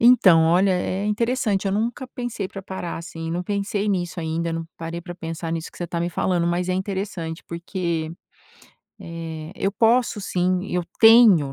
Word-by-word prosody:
então, 195 -9 +7
olha, 180 +4 +4
é 185 +2 -1
interessante, 220 -2 0
eu 195 - +1
nunca 235 +5 -1
pensei 240 -7 -4
pra 195 - -8
parar 190 -3 -5
assim, 165 -1 -6
não 175 +2 -2
pensei 200 +2 -1
nisso 180 -3 -1
ainda, 165 +1 -2
não 165 0 -4
parei 165 +1 -5
pra 175 0 -8
pensar 165 -1 -5
nisso 165 -1 -4
que - - -16
você 175 - -3
tá 170 - -3
me 170 - 0
falando, 175 -1 0
mas 175 +1 0
é - - +1
interessante, 190 -4 -4
porque, 170 -2 -3 0.9
eh, 165 -1 -7
eu 195 - 0
posso 230 -1 +3
sim, 185 0 0
eu 180 0 0 0.2
tenho, 220 - +7
180 Hz, 175 wpm, -23 LUFS, 165-205 Hz, 0.9 s, então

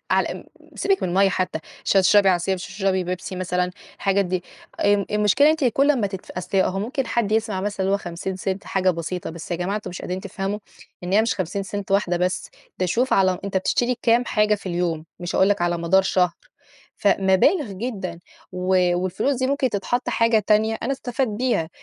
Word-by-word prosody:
على - - +2
م - - -10 0.3
سيبِك 390 -1 +1
من - - 0
المَيّة 195 +2 +4
حتى، 185 -3 -1 0.3
مش - - +2
هتشربي 195 +1 +5
عصير، 185 +1 +2
مش 180 - -6
هتشربي 190 -2 -1
بيبسي 185 +1 -4
مثلًا، 180 0 -1 0.3
الحاجات 200 0 +1
دي، 180 -1 -2 0.4
آمم 205 -1 +3
آآ - - -2
المشكلة 210 +7 +4
إن - - +7
أنتِ 315 -3 0
كل 275 +4 +3
أما 240 -8 +2
تدف 190 -2 -8
أصل 185 +2 -2
هو 190 0 +1
ممكن 255 +5 -2
حد 220 -3 0
يسمع 220 -3 0
مثلًا 205 0 -3
اللي 195 - +1
هو 200 - +1
¢50 190 +2 -4
حاجة 185 -1 +1
بسيطة، 170 +1 -4
بس 165 +1 -9
يا 175 - 0
جماعة 185 +4 -2
أنتم 205 -4 -6
مش 175 - -7
قادرين 185 +1 -3
تفهموا 195 +1 -4 0.5
إن 180 - -3
هي 215 - +5
مش 225 - 0
¢50 195 +2 -4
واحدة 185 -3 +2
بس، 180 +1 -1 0.3
ده 185 - +1
شوف 245 +9 +1
على 185 -2 +3
أنت 195 -1 -3
بتشتري 240 +6 +1
كام 235 +1 +4
حاجة 210 -2 +2
في 200 - -9
اليوم، 170 -3 -1 0.2
مش 175 0 -4
هاقول 190 - +4
لك 205 -3 +1
على 175 0 +1
مدار 170 +3 +3
شهر، 185 -2 +2 0.7
فمَبالغ 200 - +3
جدًا 190 -5 -5 0.3
و 180 -1 +2
والفلوس 195 +10 0
دي 260 - +1
ممكن 270 -2 +1
تتحط 245 +5 -1
حاجة 230 -1 +3
تانية 220 +1 +3
أنا 260 - 0
استفاد 260 -1 -2
بيها، 215 -7 0
195 Hz, 205 wpm, -23 LUFS, 180-220 Hz, 0.7 s, إن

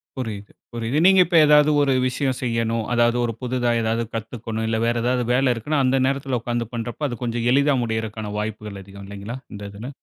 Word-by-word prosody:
புரியுது, 110 -6 -6 0.2
புரியுது. 120 +5 -1
நீங்க 190 0 +6
இப்ப 175 0 -2
ஏதாவது 150 0 +5
ஒரு 135 -2 +2
விஷயம் 130 0 -1
செய்யணும். 115 -2 -1
அதாவது 120 0 +3
ஒரு 115 - -2
புதிதா 125 -1 0
ஏதாவது 115 +1 0
கத்துக்கணும். 110 0 -4
இல்ல 110 0 0
வேற 120 0 +1
ஏதாவது 125 0 +1
வேல 130 0 +3
இருக்குனா, 145 +7 -1
அந்த 130 +1 +2
நேரத்தில 135 -2 -1
உக்கார்ந்து 120 -1 -2
பண்றப்ப, 120 +5 -3
அது 120 - -5
கொஞ்சம் 120 0 -2
எளிதா 140 +2 +3
முடியறக்கான 110 -2 -3
வாய்ப்புகள் 105 -1 -5
அதிகம் 100 0 -12
இல்லைங்களா! 100 +5 -7 0.2
இந்த 105 - -8
இதுல? 110 +6 -8
120 Hz, 185 wpm, -22 LUFS, 110-130 Hz, 0.2 s, நீங்க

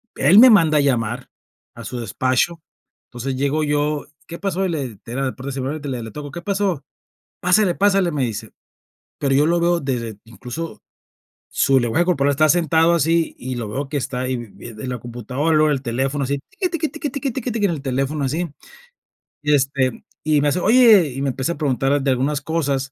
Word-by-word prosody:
él 165 +9 +5
me 255 +2 +10
manda 165 -7 +5
a 145 - +4
llamar 120 -2 -1 0.5
a 115 - -9
su 120 +3 -5
despacho, 130 - 0 0.5
entonces 125 +2 -4
llego 140 +3 0
yo: 150 0 0 0.2
"¿Qué 170 - -7
pasó?", 195 -1 -1
y - - -1
le 135 - -4
era 130 +4 -2
la 130 - -1
puerta 135 +2 -6
cerrada, 135 +3 -3
y 145 - -5
le 125 -3 -4
le 110 - -8
tocó: 145 +3 -7
"¿Qué 170 - -7
pasó?", 195 -6 -1 0.6
"pásele, 180 0 +3
pásale", 195 -3 +2
me 145 -3 -1
dice. 115 -4 -4 0.7
Pero 135 -1 +1
yo 145 +2 +4
lo 170 +1 +2
veo 170 0 +2
desde, 115 -6 -3
incluso, 125 +9 -7 0.7
su 135 -1 +3
lenguaje 120 +8 +1
corporal 145 -5 +2
estaba 155 +3 +3
sentado 165 +1 +3
así, 165 +1 +1
y 130 0 -5
lo 115 -3 -4
veo 135 +6 -4
que 150 - -1
está 130 -2 -3
ahí 130 0 -1
vi 120 - -7
vi 110 - -12
en 110 +3 -7
la 125 -1 -3
computadora, 125 +7 -2
luego 155 0 +4
el 135 -2 -2
teléfono 135 +3 -1
así, 140 +1 -2
tiqui, 365 - -2
tiqui, 330 -2 -1
tiqui, 310 -2 -5
tiqui, 275 0 -3
tiqui, 250 0 -3
tiqui, 215 -2 +1
en 180 - 0
el 150 -4 -5
teléfono 135 +2 -1
así, 165 +6 -1 1.0
y 150 - +2
este 135 -3 0 0.2
y 150 -1 +2
me 145 - +2
hace: 175 - 0
"Oye", 215 - +6
y 135 - -4
me 140 - 0
empieza 130 +6 -2
preguntar 140 -1 +1
de 135 - 0
algunas 140 +3 0
cosas, 140 -3 -1
140 Hz, 205 wpm, -21 LUFS, 130-170 Hz, 1.0 s, me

